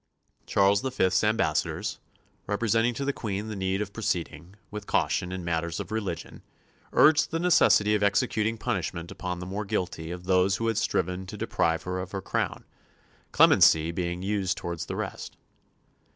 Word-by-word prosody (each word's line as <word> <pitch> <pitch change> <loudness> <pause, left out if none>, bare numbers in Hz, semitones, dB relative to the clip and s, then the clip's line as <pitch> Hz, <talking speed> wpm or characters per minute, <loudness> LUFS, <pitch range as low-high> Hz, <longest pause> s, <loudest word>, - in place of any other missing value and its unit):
Charles 100 +1 +3
V.'s 95 -9 +1
ambassadors, 105 -9 0 0.5
representing 115 +3 +1
to 140 - -3
the 140 - 0
Queen 105 -2 -4
the 110 - -4
need 95 +1 -1
of 100 -1 -11
proceeding 90 -4 -3 0.2
with 105 -1 -7
caution 90 - 0
in 90 -2 -5
matters 85 0 -2
of - - -6
religion, 100 -7 -4 0.5
urged 155 0 +5
the 165 - -2
necessity 165 -11 +4
of 105 - +1
executing 110 +1 +1
punishment 85 -5 -3
upon 90 -1 -4
the 90 - -6
more 100 +3 -4
guilty 90 -4 -3
of 90 +1 -6
those 95 +1 +3
who 115 - -3
had 115 -1 +1
striven 90 -3 -1
to - - -7
deprive 80 -1 0
her 90 0 -3
of 90 +1 -7
her 95 - -3
crown, - - -2 0.7
clemency 80 +1 +5
being 90 +1 -3
used 100 -2 -1
towards 85 -1 -5
the - - -4
rest. - - -6
95 Hz, 165 wpm, -27 LUFS, 90-105 Hz, 0.7 s, urged